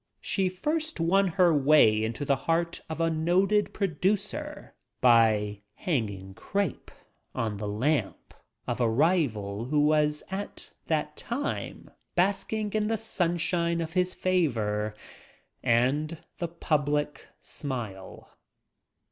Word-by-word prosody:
She 190 Hz, -2 st, 0 dB
first 305 Hz, -, -2 dB
won 190 Hz, +4 st, +3 dB
her 180 Hz, -3 st, +5 dB
way 135 Hz, -7 st, +5 dB
into 115 Hz, +6 st, -3 dB
the 140 Hz, -, +3 dB
heart 170 Hz, +1 st, +1 dB
of 160 Hz, -, -5 dB
a 165 Hz, 0 st, +2 dB
noted 185 Hz, +6 st, +2 dB
producer 205 Hz, -, -2 dB, 0.3 s
by 110 Hz, -4 st, +4 dB
"hanging 100 Hz, -, -2 dB
crepe" 190 Hz, -, -3 dB, 0.5 s
on 110 Hz, -3 st, -2 dB
the 105 Hz, +1 st, -4 dB
"lamp" 130 Hz, +9 st, -1 dB, 0.3 s
of 120 Hz, 0 st, -2 dB
a 115 Hz, -, +3 dB
rival 115 Hz, -, +1 dB
who 145 Hz, +3 st, +2 dB
was 150 Hz, 0 st, +2 dB
at 200 Hz, +1 st, -5 dB, 0.2 s
that 150 Hz, -1 st, -1 dB
time 265 Hz, +5 st, -4 dB, 0.2 s
basking 200 Hz, +3 st, 0 dB
in 215 Hz, -1 st, +1 dB
the 225 Hz, 0 st, 0 dB
sunshine 170 Hz, -4 st, 0 dB
of 165 Hz, -1 st, -4 dB
his 180 Hz, 0 st, +1 dB
favor 110 Hz, -, 0 dB, 0.7 s
and 140 Hz, +7 st, +1 dB, 0.2 s
the 170 Hz, -, -1 dB
public 150 Hz, -3 st, -1 dB
smile. 115 Hz, -9 st, -6 dB
155 Hz, 115 wpm, -28 LUFS, 120-185 Hz, 0.7 s, her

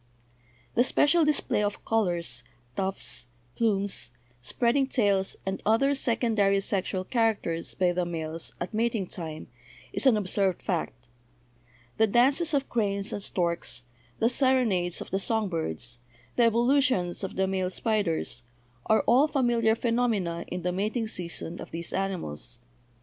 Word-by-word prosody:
"The 240 Hz, -, +4 dB
special 315 Hz, +6 st, +4 dB
display 300 Hz, -7 st, +2 dB
of 205 Hz, 0 st, -2 dB
colors, 175 Hz, -, 0 dB, 0.3 s
tufts, 190 Hz, -9 st, -2 dB, 0.3 s
plumes, 200 Hz, -, +1 dB, 0.3 s
spreading 240 Hz, -, +1 dB
tails, 200 Hz, -7 st, +1 dB
and 190 Hz, 0 st, -3 dB
other 250 Hz, +6 st, +3 dB
secondary 225 Hz, -6 st, +2 dB
sexual 190 Hz, -1 st, -1 dB
characters 210 Hz, -7 st, -1 dB
by 180 Hz, -2 st, +2 dB
the 180 Hz, 0 st, 0 dB
males 165 Hz, -1 st, -4 dB
at 175 Hz, -, -4 dB
mating 225 Hz, -2 st, 0 dB
time 160 Hz, -3 st, -6 dB, 0.5 s
is -, -, +3 dB
an 235 Hz, -5 st, +6 dB
observed 195 Hz, -2 st, 0 dB
fact; 130 Hz, -, -3 dB, 0.9 s
the 220 Hz, +1 st, +4 dB
'dances' 275 Hz, -, +3 dB
of 275 Hz, -1 st, 0 dB
cranes 200 Hz, -3 st, -1 dB
and 205 Hz, -, -3 dB
storks, 170 Hz, -9 st, -1 dB, 0.3 s
the 225 Hz, -, +3 dB
serenades 245 Hz, -9 st, +1 dB
of -, -, -8 dB
the 195 Hz, -, +1 dB
song 220 Hz, 0 st, 0 dB
birds, 120 Hz, -, -3 dB, 0.4 s
the 240 Hz, -, +4 dB
evolutions 235 Hz, -6 st, +2 dB
of 195 Hz, -, -4 dB
the 190 Hz, -, +2 dB
male 190 Hz, -1 st, -1 dB
spiders, 185 Hz, -, -1 dB, 0.5 s
are 220 Hz, -, +4 dB
all 260 Hz, +6 st, +5 dB
familiar 240 Hz, -6 st, +2 dB
phenomena 225 Hz, -8 st, 0 dB
in 180 Hz, -1 st, -5 dB
the 180 Hz, -, 0 dB
mating 215 Hz, +5 st, -1 dB
season 175 Hz, -3 st, -4 dB
of -, -, -8 dB
these 170 Hz, +1 st, -3 dB
animals. 180 Hz, -, -2 dB
200 Hz, 140 wpm, -27 LUFS, 175-235 Hz, 0.9 s, an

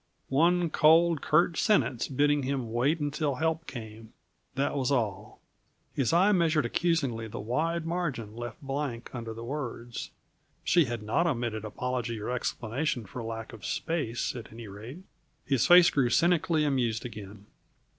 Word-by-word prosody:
One 170 Hz, +4 st, +3 dB
cold, 165 Hz, +1 st, +5 dB
curt 165 Hz, +2 st, +2 dB
sentence 165 Hz, -, +2 dB
bidding 145 Hz, +2 st, +2 dB
him 130 Hz, -4 st, -3 dB
wait 140 Hz, +8 st, +2 dB
until 145 Hz, -1 st, -1 dB
help 160 Hz, +3 st, -1 dB
came 110 Hz, -2 st, -9 dB, 0.4 s
that 140 Hz, +2 st, 0 dB
was 135 Hz, -1 st, 0 dB
all. 110 Hz, -5 st, -2 dB, 0.5 s
His 130 Hz, -4 st, +1 dB
eye 180 Hz, +5 st, +5 dB
measured 165 Hz, -6 st, +2 dB
accusingly 135 Hz, -6 st, 0 dB
the 110 Hz, -, -7 dB
wide 160 Hz, +10 st, -1 dB
margin 150 Hz, -11 st, -3 dB
left 120 Hz, 0 st, -6 dB
blank 135 Hz, -3 st, -4 dB
under 115 Hz, -3 st, -5 dB
the 115 Hz, +1 st, -7 dB
words; 120 Hz, -3 st, -5 dB, 0.5 s
she 170 Hz, -3 st, +4 dB
had 120 Hz, -3 st, -4 dB
not 140 Hz, +11 st, +1 dB
omitted 120 Hz, -7 st, -2 dB
apology 120 Hz, +1 st, -3 dB
or 105 Hz, -, -4 dB
explanation 125 Hz, +1 st, -2 dB
for 120 Hz, +5 st, -7 dB
lack 115 Hz, 0 st, -6 dB
of 110 Hz, -4 st, -11 dB
space, 145 Hz, -, -2 dB
at 115 Hz, -3 st, -8 dB
any 115 Hz, 0 st, -9 dB
rate. 115 Hz, -, -9 dB, 0.4 s
His 135 Hz, -4 st, +2 dB
face 175 Hz, 0 st, +8 dB
grew 130 Hz, -4 st, +2 dB
cynically 165 Hz, +1 st, +3 dB
amused 125 Hz, -5 st, 0 dB
again. 105 Hz, -3 st, -9 dB
130 Hz, 150 wpm, -29 LUFS, 115-160 Hz, 0.5 s, face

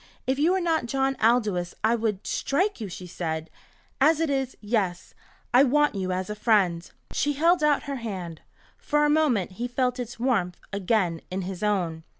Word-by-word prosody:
"If 265 Hz, +1 st, 0 dB
you 330 Hz, +5 st, +4 dB
were 380 Hz, -, +2 dB
not 325 Hz, -8 st, 0 dB
John 270 Hz, +2 st, 0 dB
Aldous 215 Hz, -7 st, +2 dB
I 220 Hz, +2 st, +4 dB
would 220 Hz, -4 st, -1 dB
strike 370 Hz, -, 0 dB
you," 210 Hz, -, -4 dB
she 180 Hz, +1 st, -8 dB
said. 160 Hz, -2 st, -4 dB, 0.5 s
"As 310 Hz, +3 st, +5 dB
it 325 Hz, -3 st, +1 dB
is 270 Hz, -2 st, -2 dB
yes 205 Hz, -5 st, -2 dB, 0.4 s
I 250 Hz, -, +7 dB
want 295 Hz, +2 st, +3 dB
you 190 Hz, -2 st, -2 dB
as 185 Hz, 0 st, -2 dB
a 210 Hz, -, -3 dB
friend." 195 Hz, -6 st, +2 dB, 0.2 s
She 290 Hz, +1 st, +1 dB
held 330 Hz, +3 st, +3 dB
out 295 Hz, -1 st, +3 dB
her 280 Hz, -1 st, -4 dB
hand. 185 Hz, -8 st, -6 dB, 0.4 s
For 295 Hz, 0 st, +1 dB
a 295 Hz, -, +3 dB
moment 280 Hz, -, +2 dB
he 245 Hz, -, 0 dB
felt 250 Hz, 0 st, -1 dB
its 240 Hz, -1 st, -6 dB
warmth 200 Hz, -9 st, 0 dB, 0.2 s
again 190 Hz, -4 st, 0 dB
in 185 Hz, +1 st, -3 dB
his 185 Hz, 0 st, -6 dB
own. 180 Hz, -6 st, 0 dB
230 Hz, 185 wpm, -26 LUFS, 185-275 Hz, 0.5 s, I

